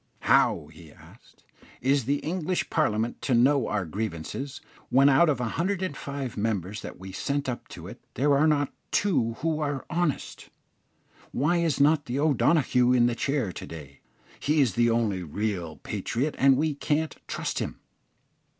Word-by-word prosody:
"How," 75 - +3
he 80 -1 -14
asked, - - -19 0.4
"is 135 0 +1
the 140 +3 +1
English 180 +2 -2
Parliament 115 -7 0
to 130 - +1
know 130 +1 +4
our 105 -3 -1
grievances, 105 - -5 0.3
when 135 +2 +5
out 145 +5 +5
of 145 - +1
105 140 - -3
members 105 -2 -2
that - - -9
we 95 +1 -8
send 140 +8 -2
up 125 -2 -4
to - - -10
it, - - -10
there 140 +3 +3
are 150 +3 +4
not 145 -2 +1 0.2
two 140 - +1
who 160 -1 0
are 145 -3 -2
honest? 170 -4 -2 0.8
Why 150 +7 +1
is 165 -5 0
not 145 +1 +4
the 125 +3 -2
O'Donoghue 135 -4 +3
in 120 -1 +4
the 120 - +2
chair 130 -4 -1
to - - -8
day? 70 -4 -10 0.4
he 150 +2 +1
is 130 -8 +3
the 120 +3 +3
only 110 -5 +1
real 90 -1 -3
patriot, 140 +6 -3
and 135 -1 +5
we 155 +1 +1
can't 150 +2 -1
trust - - -3
him. - - -4
135 Hz, 160 wpm, -27 LUFS, 110-150 Hz, 0.8 s, when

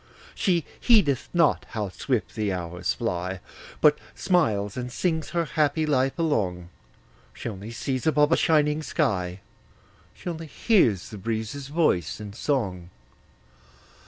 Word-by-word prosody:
She 175 -6 +1
heedeth 200 - +3
not 170 -3 +2
how 105 -3 -3
swift 85 -4 -2
the 105 -2 -1
hours 90 -1 -2
fly, 90 +1 -2 0.4
But 150 -1 +5 0.2
smiles 110 - +1
and 125 0 -4
sings 160 +2 -1
her 170 +1 0
happy 155 0 +1
life 135 -3 +1
along; 95 - 0 0.7
She - - -6
only 105 -1 -6
sees 130 +3 -3
above 150 -1 +4
a - - +6
shining 150 -1 +2
sky; 95 - -1 0.7
She - - -11
only 165 -2 -4
hears 130 - +2
the 105 - -8
breezes' 115 +6 -3
voice 140 - +1
in 105 -2 -7
song. 100 -9 -2
130 Hz, 130 wpm, -26 LUFS, 100-155 Hz, 0.7 s, a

